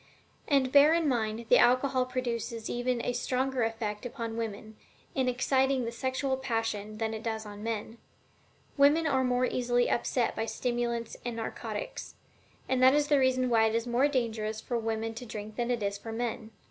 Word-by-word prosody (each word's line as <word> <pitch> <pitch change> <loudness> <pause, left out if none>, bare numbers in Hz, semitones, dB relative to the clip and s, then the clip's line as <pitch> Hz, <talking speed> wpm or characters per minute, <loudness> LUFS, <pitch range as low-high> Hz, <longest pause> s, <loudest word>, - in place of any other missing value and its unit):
And 270 -3 +2
bear 290 +3 +7
in 335 -2 +1
mind 230 -3 -1
that - - +6
alcohol 255 +1 +3
produces 235 -3 -3
even 245 0 -1
a 245 - 0
stronger 255 +1 -1
effect 225 -1 -2
upon 235 -2 -5
women, 220 -1 -5 0.4
in 260 -1 0
exciting 265 +1 +1
the 230 - -3
sexual 260 +2 -1
passion, 225 -4 -2
than 220 0 -2
it 220 - -5
does 220 -1 -3
on 205 0 -9
men. 225 +1 -4 0.8
Women 290 +4 +5
are 265 -3 +2
more 250 0 +2
easily 245 -1 +1
upset 240 0 0
by 225 - -2
stimulants 240 -2 -2
and 240 -1 -3
narcotics, 365 - -5 0.5
and 260 -1 +1
that 260 +2 +7
is 295 0 +2
the 290 -2 +5
reason 255 -1 +2
why 225 -2 +4
it 220 - -1
is 230 +1 0
more 245 +3 +3
dangerous 220 -5 -2
for 240 - -4
women 225 -1 -2
to 235 +2 -8
drink 215 -1 -7
than 240 0 -1
it 240 -3 0
is 200 0 -2
for 225 - -7
men. 230 -1 -3
240 Hz, 185 wpm, -29 LUFS, 225-260 Hz, 0.8 s, bear